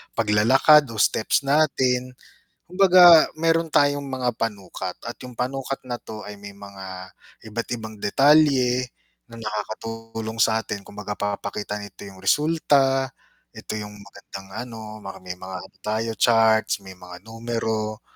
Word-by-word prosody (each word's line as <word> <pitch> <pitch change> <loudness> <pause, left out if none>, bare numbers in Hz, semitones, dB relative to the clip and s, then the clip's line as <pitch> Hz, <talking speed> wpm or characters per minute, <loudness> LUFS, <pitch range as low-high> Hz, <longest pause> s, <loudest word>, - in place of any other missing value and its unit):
paglalakad 115 +8 +5
o 110 - -6
steps 110 +6 +2
natin. 130 -4 +2 0.6
Kumbaga 180 -3 +7
meron 165 0 +2
tayong 145 0 +3
mga 130 -3 -2
panukat, 95 -4 -4
at 120 - -5
yung 125 -1 -9
panukat 135 +1 -3
na 120 -1 -3
to 110 -1 -9
ay 105 - -8
may 100 0 -10
mga 95 -2 -10 0.4
iba't 115 +2 -4
ibang 110 -1 -8
detalye 130 -1 +3 0.4
na 115 - -11
nakakatulong 115 +1 -6
sa 110 0 +3
atin 100 0 -6
kumbaga 105 0 -6
papakita 105 0 -4
nito 100 -2 -11
yung 95 -1 -13
resulta, 135 -1 +2 0.5
ito - - -6
yung 105 0 -8
magandang 100 -1 -12 0.2
ano, 110 -2 -9
maraming 90 -2 -8
mga 95 0 -7
ano - - -19
tayo 110 +2 -1
charts, 110 -2 +3
may 95 0 -10
mga 90 0 -12
numero, 110 -1 -3
115 Hz, 135 wpm, -23 LUFS, 105-130 Hz, 0.6 s, Kumbaga